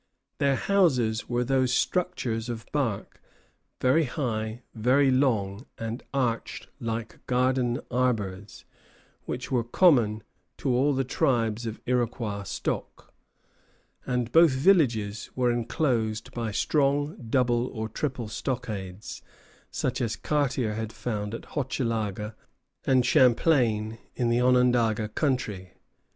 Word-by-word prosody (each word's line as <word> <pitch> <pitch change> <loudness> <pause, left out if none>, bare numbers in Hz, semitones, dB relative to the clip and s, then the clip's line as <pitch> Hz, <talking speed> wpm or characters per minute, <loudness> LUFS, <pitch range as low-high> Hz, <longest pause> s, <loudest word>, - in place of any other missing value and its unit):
Their 140 -1 +3
houses 130 - +2
were 120 0 +1
those 130 0 +1
structures 125 -7 0
of 115 -1 -5
bark, 130 -9 -2 0.6
"very 135 +5 +3
high, 115 -4 -3
very 130 +4 +3
long, 115 -5 +1
and 115 +2 -4
arched 125 -5 -2
like 115 0 -5
garden 125 -1 +1
arbors," 105 -6 -1 0.6
which - - -5
were 125 -3 +2
common 115 - +3 0.3
to 130 - 0
all 135 +3 +2
the 135 - +1
tribes 120 -5 0
of 110 - -5
Iroquois 120 -4 -1
stock, - - -4 0.9
and 125 -2 -1
both 165 0 +7
villages 130 - +2
were 125 -1 +2
enclosed 115 -2 -1
by 115 -2 -3
strong 145 +5 +1
double 120 -1 +2
or 110 -3 -4
triple 125 0 -3
stockades, 105 -5 -5 0.5
such - - -2
as 115 -3 -1
Cartier 135 -7 0
had 110 0 -4
found 105 -2 -4
at - - -9
Hochelaga, 110 -7 -2 0.5
and 130 -2 +4
Champlain 120 -5 +3 0.2
in 120 -1 0
the 120 +1 +2
Onondaga 120 -4 +3
country. 105 - -2
120 Hz, 115 wpm, -27 LUFS, 110-130 Hz, 0.9 s, both